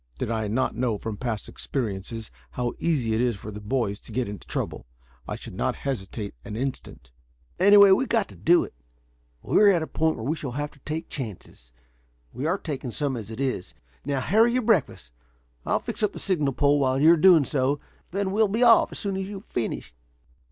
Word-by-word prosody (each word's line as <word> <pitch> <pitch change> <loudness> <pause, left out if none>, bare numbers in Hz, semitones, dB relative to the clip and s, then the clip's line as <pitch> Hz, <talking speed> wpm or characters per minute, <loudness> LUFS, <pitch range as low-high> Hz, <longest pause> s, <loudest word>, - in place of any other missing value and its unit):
Did 110 - -3
I 110 -2 -1
not 125 +5 0
know 120 -2 0
from 110 +1 -5
past 110 -1 -4
experiences 110 -2 -4 0.2
how 120 -1 -2
easy 135 -10 0
it 110 - +1
is 120 -2 +1
for 105 +2 -8
the 105 +1 -8
boys 105 -2 -1
to - - -13
get 125 -1 -1
into 100 -3 -8
trouble, - - -4 0.4
I - - -3
should - - -9
not - - -1
hesitate 105 -5 -4
an 105 - -7
instant." 120 - -5 0.5
"Anyway, 200 +1 +8
we've 255 +8 +3
got 225 -4 +2
to - - -13
do 175 +1 +4
it. - - -9 0.7
We - - +3
are 210 - +7
at 175 -5 +3
a - - -2
point 160 0 0
where 110 - -6
we 150 +5 0
shall 140 -6 -6
have 145 +2 -3
to 140 - -21
take 160 +4 -5
chances. 100 - -8 0.6
We 130 +6 -3
are 180 +4 +1
taking 140 -8 -5
some 140 +2 -2
as 110 -3 -6
it 115 - -8
is. 130 -9 -2 0.3
Now, 140 -2 -1
hurry 220 - +3
your 255 0 +1
breakfast. 200 - +1 0.6
I'll - - +2
fix - - -6
up 210 -1 +1
the - - -7
signal 150 -8 0
pole 145 +2 +3
while 130 -1 +2
you 155 +3 +7
are - - +5
doing 165 -3 +6
so, 140 +1 0 0.3
then 195 +1 -1
we'll 215 +2 +3
be 220 +5 +1
off 235 -2 +6
as - - -7
soon 200 -2 -2
as 190 0 -3
you 205 - -7
have - - -29
finished." 115 - -3
135 Hz, 215 wpm, -25 LUFS, 115-175 Hz, 0.7 s, Anyway